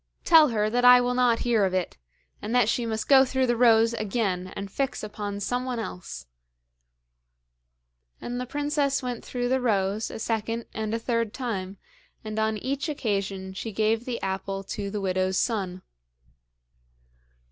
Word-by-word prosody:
Tell 320 -3 +7
her 215 -2 +1
that 245 +3 0
I 250 0 +9
will 245 0 0
not 245 -2 +2
hear 230 -4 +3
of 185 -1 +1
it, 185 -2 -2 0.5
and 220 +4 -3
that 245 -4 +4
she 235 +1 0
must 220 -1 -3
go 270 -1 +7
through 260 0 0
the 240 -1 +1
rows 230 -1 +5
again 195 -4 -2
and 200 -1 -6
fix 275 0 -2
upon 205 -1 -5
someone 250 +4 -2
else'; 180 -5 -6 1.9
and 245 +1 -4
the 250 - -5
princess 285 0 0
went 245 -2 -4
through 245 -1 -3
the 260 +1 +1
rows 205 -2 0
a - - -7
second 225 +1 -2
and 220 0 -2
a - - 0
third 230 -2 -1
time, 200 -6 -4 0.5
and 215 0 -4
on 220 0 0
each 275 +7 -3
occasion 195 -8 -2
she 220 +4 -5
gave 220 +3 0
the 245 -2 -3
apple 195 0 -3
to 200 +1 -5
the 205 0 -4
widow's 185 0 0
son. 190 -6 -1
225 Hz, 165 wpm, -26 LUFS, 200-245 Hz, 1.9 s, I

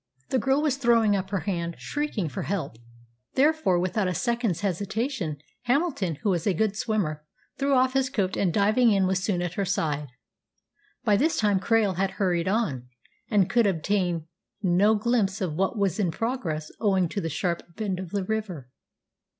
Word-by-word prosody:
The 260 - +2
girl 270 +3 +2
was 285 -4 +1
throwing 230 -5 +3
up 190 -1 -2
her 195 -2 -1
hand, 170 -4 -2
shrieking 290 - -2
for 140 - -5
help; 165 - -3 0.6
therefore, 295 - +3
without 185 +3 0
a 180 - -1
second's 235 -6 0
hesitation, 200 - -2 0.3
Hamilton, 250 - +1
who 205 - +2
was 175 0 -1
a 195 - +2
good 210 +3 +1
swimmer, 195 -9 -1 0.4
threw 275 0 +2
off 260 0 +3
his 265 -1 +1
coat, 200 -8 -1
and, 185 -3 +1
diving 215 +6 +4
in, 195 -3 +3
was 190 0 0
soon 180 -4 0
at 175 -1 -3
her 200 - -1
side. 150 -6 -1 1.0
By 205 - +4
this 310 +7 +1
time 205 -3 +2
Krail 205 -2 +2
had 195 0 +1
hurried 175 -3 +1
on, 185 - -1 0.4
and 200 -5 +3
could 235 -3 +3
obtain 175 -2 0 0.4
no 195 +4 +4
glimpse 215 -3 +1
of 180 -6 -2
what 195 +7 0
was 200 -2 0
in 190 -4 +2
progress 165 -7 -3
owing 190 -4 +2
to 200 - -3
the 165 - -2
sharp 170 +3 -1
bend 195 -4 -2
of 185 -2 -6
the 200 +1 -2
river. 185 -11 -4
200 Hz, 180 wpm, -26 LUFS, 175-225 Hz, 1.0 s, diving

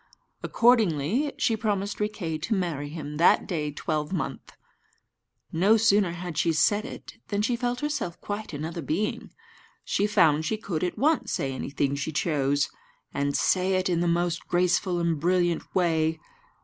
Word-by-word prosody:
Accordingly, 230 - +2
she 225 - +2
promised 205 -2 -2
Riquet 205 -7 -2
to 215 +8 -1
marry 165 -6 -2
him 150 -1 -6
that 170 - +4
day 155 -5 -2
twelvemonth. 155 +3 -3 1.0
No 195 +7 +4
sooner 205 -5 +3
had 175 -2 -5
she 165 - +2
said 205 +7 +2
it 260 - -9
than 205 0 -1
she 240 +2 +1
felt 245 +1 -2
herself 295 - -3
quite 205 +1 -5
another 160 +3 -5
being. 165 +9 -2 0.6
She 205 - +1
found 160 -7 +4
she 215 +7 -1
could 185 -6 -3
at 180 - -2
once 285 -4 +1
say 135 -1 -1
anything 140 +1 -2
she 140 +2 -3
chose, 145 -2 +1 0.5
and 140 0 0
say 185 0 +2
it 185 0 0
in 175 -2 +1
the 175 - +1
most 175 0 0
graceful 180 0 +1
and 170 -3 0
brilliant 175 0 +2
way. 160 -3 +1
175 Hz, 155 wpm, -26 LUFS, 155-205 Hz, 1.0 s, that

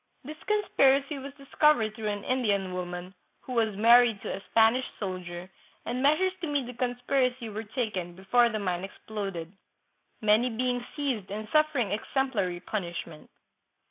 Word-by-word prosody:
This 305 +4 -9
conspiracy 280 -9 +2
was 275 +1 -7
discovered 275 -5 +2
through 220 -1 -5
an 205 -1 -2
Indian 205 -7 0
woman, 180 0 -5 0.3
who 255 - -7
was 225 -4 +1
married 230 0 +6
to - - -3
a 195 - -8
Spanish 230 +3 +4
soldier, 180 -3 -5 0.4
and 250 +1 -2
measures 310 +7 +3
to 335 - -2
meet 285 -3 0
the 250 - -7
conspiracy 245 0 0
were 215 +1 -5
taken, 210 -6 -3
before 235 +6 +3
the 220 - -2
mine 185 -3 -2
exploded, 195 -4 -6 0.7
many 215 +3 +3
being 245 +1 -1
seized 260 -10 -2
and 215 +2 -5
suffering 305 -9 +2
ex 205 - -3
emplary 200 -10 0
punishment. 170 -5 -5
225 Hz, 150 wpm, -28 LUFS, 195-260 Hz, 0.7 s, married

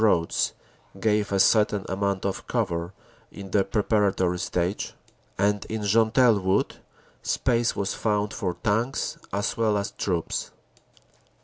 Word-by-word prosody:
8 - - +3
roads 85 -6 +2 0.5
gave 105 -2 +1
a 100 - +1
certain 105 0 +3
amount 100 0 -1
of 100 - -3
cover 85 +1 -1 0.4
in 95 -1 -9
the 100 - +3
preparatory 100 -3 +1
stage, 90 +1 -2 0.4
and 100 +1 +1
in 110 -1 -4
Gentelles 110 +2 +4
Wood 95 +2 +1 0.4
space 120 -2 +1
was 100 0 -1
found 105 -1 0
for 90 -5 -2
tanks 115 +5 0
as 100 +2 -1
well 110 -2 +2
as 100 - -2
troops. 85 -4 -2
100 Hz, 130 wpm, -26 LUFS, 95-110 Hz, 0.5 s, Gentelles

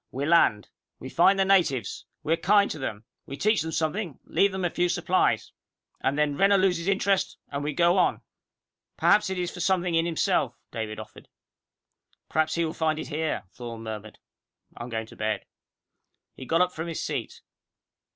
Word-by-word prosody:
We 135 +2 -3
land. 145 -10 +3 0.3
We 130 - -8
find 190 +6 +4
the 195 - +3
natives. 160 - +1 0.2
We 155 +2 +1
are - - +1
kind 200 +3 +3
to 155 - -5
them. 110 -5 -4 0.2
We 140 - -6
teach 215 +1 +2
them 160 +1 -4
something, 160 - -2
and - - -17
leave 200 0 +4
them 190 -1 -2
a 175 - 0
few 175 0 +1
supplies. 180 +1 +1 0.5
And 135 +2 0
then 150 -1 +1
Renner 200 +1 +5
loses 185 -2 +1
interest, 195 0 +1
and 140 0 -4
we 150 +1 -2
go 175 +4 +3
on!" - - +2 0.8
"Perhaps 210 -1 +4
it 190 - -3
is 180 -1 -2
for 180 - -10
something 180 -1 +1
in 165 +1 +2
himself," 165 -2 +1 0.2
David 110 -1 -4
offered. 110 0 -11 1.0
"Perhaps 155 0 +1
he 170 0 +1
will 160 - -3
find 155 -1 0
it - - -6
here," 155 +1 -2
Thorne 115 -2 -8
murmured. 110 -1 -7 0.6
"I'm 120 - -7
going 110 -1 -3
to - - -15
bed." 110 0 -2 0.9
He 130 - -10
got 165 +2 +3
up 180 0 +3
from 160 0 -5
his 165 - -4
seat. - - -4
165 Hz, 190 wpm, -26 LUFS, 135-185 Hz, 1.0 s, Renner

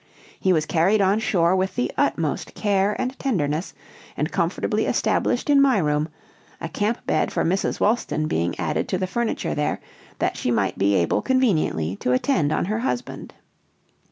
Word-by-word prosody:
He 190 - +2
was 155 -3 +2
carried 175 +7 +2
on 195 +2 +3
shore 190 -6 +2
with 190 0 -1
the 245 - -1
utmost - - -1
care 200 0 +1
and 255 +1 -3
tenderness, 170 - -1 0.4
and - - -1
comfortably - - 0
established 245 - 0
in 285 -1 +5
my 270 -4 +4
room, 150 -2 0 0.5
a - - -4
camp 210 +7 -2
bed 155 - +1
for - - 0
Mrs. 185 +4 0
Wolston 205 -8 +1
being 85 - -1
added - - -1
to 185 - -1
the 185 - -1
furniture 235 +5 -2
there, 150 - -1 0.4
that - - -1
she - - -2
might 100 -5 0
be 100 +1 +3
able 85 -3 +1
conveniently 165 - +1
to 125 - 0
attend 150 - +1
on - - 0
her 215 +4 -1
husband. 245 0 -4
190 Hz, 170 wpm, -23 LUFS, 150-220 Hz, 0.5 s, in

